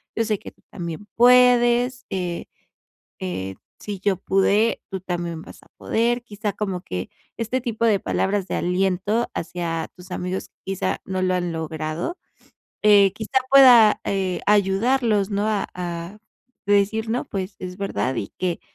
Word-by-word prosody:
yo 230 - +1
sé 215 -2 0
que - - -10
tú - - -33
también 170 +2 -6
puedes, 245 0 +5
eh, 180 -2 -3 0.7
eh, 95 +1 -4 0.2
si 205 -2 -6
yo 195 -2 +1
pude, 200 +4 +2
tú 190 -1 -4
también 175 -2 -4
vas - - -14
a - - -23
poder", 240 +2 0
quizá 210 -2 -4
como 195 -3 -3
que, 90 - -5 0.3
este 230 +3 -1
tipo 230 -2 -1
de 210 -4 +3
palabras 195 -1 -1
de - - -4
aliento 190 +5 0
hacia 165 -1 -3
tus 180 0 -14
amigos, 180 +1 -4 0.2
quizá 195 -1 -2
no 190 -1 -2
lo 185 - +1
han 175 -1 -1
logrado, 160 - -4 0.7
eh, 205 -2 +6
quizá 220 +5 0
pueda, 250 -6 +8
eh, 190 -2 -1
ayudarlos, 210 +1 +2
¿no?, 205 +1 0
a 210 -2 0
a 175 +2 -5 0.5
decir 205 +2 +2
no 245 +2 -1
pues, 195 0 -5
es 180 0 -6
verdad, 195 -9 -1
y 100 - -3
que 180 -2 -1
195 Hz, 155 wpm, -23 LUFS, 180-220 Hz, 0.7 s, pueda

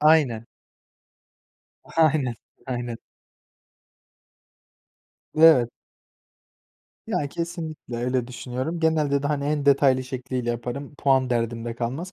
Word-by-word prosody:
Aynen. 150 -8 +4 1.5
Aynen, 150 -6 +3 0.3
aynen. 120 -2 -3 2.4
Evet. 155 -7 +7 1.4
Ya 145 - -1
kesinlikle 160 -6 -5
öyle 125 +1 0
düşünüyorum. 130 +6 -4
Genelde 150 -3 +2
de - - 0
hani, 145 -1 -1
en 145 0 -1
detaylı 135 -2 +4
şekliyle 130 -2 -3
yaparım. 125 +5 -5
Puan 135 -3 +2
derdim 115 -1 -1
de 120 -1 -4
kalmaz. 135 +11 -4
135 Hz, 95 wpm, -24 LUFS, 120-150 Hz, 2.4 s, Evet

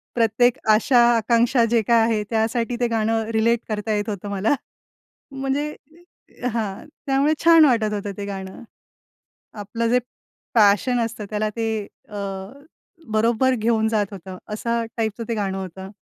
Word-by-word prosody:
प्रत्येक 235 +1 +3
आशा, 240 +4 +4 0.2
आकांक्षा 235 +2 +3
जे 230 -2 +4
काय 235 -1 +5
आहे 225 -2 +1
त्यासाठी 230 +1 0
ते 240 - +2
गाणं 225 0 0
रिलेट 230 +1 +2
करता 215 +1 -2
येत 205 +1 -2
होतं 205 0 -5
मला. 200 +6 +1 0.8
म्हणजे 275 +2 -2 0.8
हां, 210 -4 -3 0.2
त्यामुळे 275 +2 +2
छान 330 -2 +8
वाटत 225 -6 +2
होतं 205 -1 -3
ते 200 - -4
गाणं. 190 -1 -7 1.0
आपलं 230 +3 -2
जे 250 +1 +4 0.5
पॅशन 220 +3 +4
असतं 225 -2 -6
त्याला 215 0 0
ते 225 -1 0 0.4
अ, 210 - -10 1.0
बरोबर 230 +4 +2
घेऊन 220 -1 +1
जात 215 -2 +1
होतं 190 -1 -9 0.2
असा 230 +2 -1
टाइपचं 225 0 -2
ते 230 - 0
गाणं 195 -2 -2
होतं. 190 0 -7
225 Hz, 140 wpm, -22 LUFS, 210-235 Hz, 1.0 s, छान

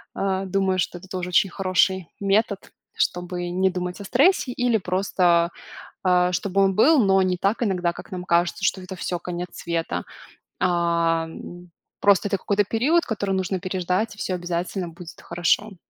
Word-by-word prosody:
э, 190 -1 -1
думаю, 190 0 +1
что 175 - -1
это 190 - -14
тоже 180 -1 -4
очень 180 +2 +3
хороший 185 -1 +1
метод, 200 0 0 0.2
чтобы 175 0 -2
не 190 +2 +2
думать 180 +1 -4
о - - -7
стрессе 270 - +3
или 245 -2 +2
просто, 180 -2 +1 0.5
а, 180 -1 +3
чтобы 195 +1 0
он 195 -1 +3
был, 285 - +5
но 195 -1 +4
не 180 -1 0
так 200 +6 0
иногда, 180 -5 0
как - - -11
нам 180 -1 -5
кажется, 170 +1 +1
что 190 - +1
это 185 +1 -8
всё, 175 - -2
конец 180 0 -5
света. 170 -1 -3 0.6
А, 170 -2 +1 0.7
просто 200 0 +4
это 195 - +1
какой-то 205 +2 +1
период, 280 - +2
который 200 -4 -2
нужно 190 0 -1
переждать, 185 +3 -1
и - - -24
всё 185 - -2
обязательно 175 +1 -3
будет 170 +1 -12
хорошо. 195 +4 0
185 Hz, 165 wpm, -23 LUFS, 175-195 Hz, 0.7 s, был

